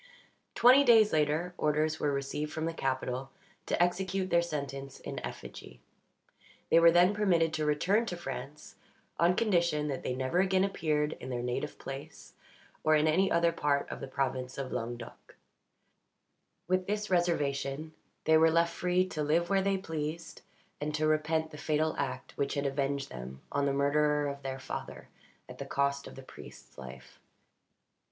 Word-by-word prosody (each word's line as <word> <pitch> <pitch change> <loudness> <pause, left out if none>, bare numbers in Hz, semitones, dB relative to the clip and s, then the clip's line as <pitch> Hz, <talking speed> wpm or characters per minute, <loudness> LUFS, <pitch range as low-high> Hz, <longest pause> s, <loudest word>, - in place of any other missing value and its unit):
Twenty 255 +4 +7
days 225 -5 +6
later, 155 +3 +1
orders 155 +1 +1
were 145 - +1
received 140 +2 -3
from 160 0 -3
the 165 - -2
capital 130 -2 -2 0.4
to - - 0
execute 185 +2 0
their 170 0 +5
sentence 140 -4 -5
in - - -6
effigy. - - -9 0.9
They 165 - +7
were 170 0 +8
then 175 +3 +5
permitted 175 -6 +2
to 155 -1 -1
return 195 +10 +2
to 175 - -4
France, 150 -3 -8 0.4
on 170 +2 +4
condition 170 -9 +1
that 135 - -3
they 125 - -3
never 130 +7 0
again 190 0 +3
appeared 155 -6 0
in 130 - -7
their 120 -1 -3
native 125 +4 -3
place, 135 +1 -9 0.5
or 155 0 +4
in 155 +1 +3
any 185 +5 +3
other 170 0 +3
part 145 -3 0
of - - -6
the 135 - -6
province 130 -1 -2
of 135 -2 -4
Languedoc. 120 -1 -6 1.3
With 185 0 +1
this 210 0 -2
reservation 155 -3 0 0.3
they 160 0 +5
were 160 +1 +5
left 170 +1 +2
free 180 +1 +1
to 155 - -4
live 165 +4 +1
where 195 -1 +4
they 195 0 +1
pleased, 160 -2 -5 0.4
and 150 0 -2
to 155 0 0
repent 155 +1 +1
the 150 - -10
fatal 155 +1 0
act 130 -2 -4
which 140 +1 0
had 140 0 -1
avenged 140 0 -1
them 65 +1 -8
on 140 0 +1
the - - +2
murderer 150 +1 +2
of 140 0 -7
their 135 -1 -4
father 130 - -7 0.4
at - - -11
the - - -4
cost 140 0 0
of - - -11
the 135 - -10
priest's - - -13
life. 65 -1 -11
155 Hz, 170 wpm, -30 LUFS, 140-170 Hz, 1.3 s, were